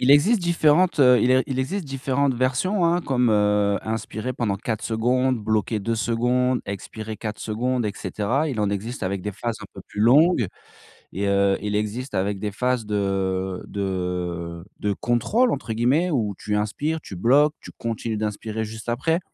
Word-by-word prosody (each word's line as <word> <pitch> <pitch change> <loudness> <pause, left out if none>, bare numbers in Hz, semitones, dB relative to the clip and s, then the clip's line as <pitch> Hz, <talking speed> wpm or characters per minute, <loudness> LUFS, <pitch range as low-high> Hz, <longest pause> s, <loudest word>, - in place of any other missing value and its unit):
Il 125 - +3
existe 195 +10 +5
différentes, 170 -1 +3
heu, 125 -2 +7
il - - +3
e 130 0 +4
il 130 -2 -2
existe 175 +9 -2
différentes 135 0 0
versions, 130 - +1
hein, 170 +1 +3
comme, 125 -7 +1
heu, 105 -1 +2
inspirer 110 +2 -3
pendant 115 -5 -1
4 110 +2 -3
secondes, 125 +3 +1
bloquer 110 0 0
2 115 +3 -1
secondes, 125 +3 +1
expirer 110 +2 -6
4 110 -1 -5
secondes, 120 +3 -1
et - - 0
cetera. 125 +13 -1
Il 125 -7 -2
en 105 -1 +1
existe 105 +5 -4
avec 95 0 -2
des 105 - -3
phases 115 +3 -3
un - - -8
peu - - -9
plus 105 - -5
longues 135 - +5 0.7
et, 100 +3 -1
heu, 100 0 +3
il 105 0 -2
existe 110 +5 -3
avec 100 +1 0
des 105 +1 -3
phases 125 +2 0
de 95 -2 -1
de 90 -3 -3 0.2
de 105 -1 0
contrôle 205 - +1
entre 130 -4 -3
guillemets 130 +11 +2
où 110 -9 0
tu 105 - -3
inspires, 145 +10 -1
tu 100 - -9
bloques, 140 - +4
tu - - -10
continues 115 -1 -3
d'inspirer 110 +1 -3
juste 110 +1 -8
après. 160 +8 +1
115 Hz, 180 wpm, -23 LUFS, 105-130 Hz, 0.7 s, heu